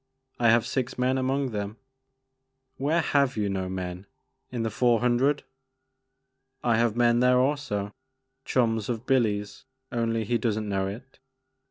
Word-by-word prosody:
I 120 -1 +4
have 115 0 +4
six 130 -2 -2
men 130 +1 +1
among 135 0 0
them." 105 0 -4 1.0
"Where 155 +5 +1
have 140 -4 +1
you 105 -1 0
no 95 -1 -2
men? 90 0 -5 0.4
In 120 -2 -3
the 115 - -1
Four 120 +1 +3
Hundred?" 125 +4 +2 0.6
" 135 - -50
I 110 - +4
have 115 -1 +2
men 120 0 +3
there 125 0 +4
also, 125 -7 0 0.3
— 130 - -53 0.2
chums 115 -4 0
of 120 0 -3
Billy's 105 -6 0 0.3
only 115 -2 0
he 120 +3 0
does 110 -3 0
n't 110 - -4
know 95 -2 -1
it. 120 +7 -9
120 Hz, 160 wpm, -27 LUFS, 105-130 Hz, 1.0 s, I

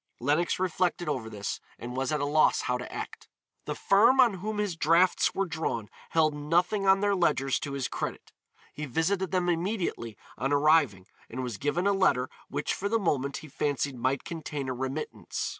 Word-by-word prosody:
Lenox 150 +7 +1
reflected 180 -1 0
over 125 -7 -2
this 105 -2 -4 0.2
and 125 +1 -7
was 135 +1 -1
at 150 - 0
a 145 - 0
loss 155 +2 +3
how 125 - -1
to 125 0 -6
act. - - -7 0.4
The - - -3
firm 230 +7 +4
on 230 -7 +5
whom 215 +3 -3
his 205 -4 -1
drafts 165 +3 +3
were 195 - +1
drawn 155 - -3 0.2
held 155 -2 +3
nothing 175 +7 +1
on 195 0 +5
their 205 0 +2
ledgers 145 -7 +1
to 140 - -5
his 135 -2 -2
credit. - - -5 0.4
He 150 0 -5
visited 180 +8 0
them 180 -2 0
immediately 175 - -2 0.2
on 135 +2 0
arriving 145 - +3 0.2
and 130 +3 -4
was 120 -4 -4
given 160 - -1
a 200 - +4
letter 160 -10 +2 0.2
which 145 +1 -2
for 200 - -2
the 230 - +2
moment 140 -9 0
he - - -10
fancied 145 -1 -1
might 130 +2 -1
contain 150 -4 -5
a - - -1
remittance. 135 +4 -4
155 Hz, 190 wpm, -28 LUFS, 135-185 Hz, 0.4 s, on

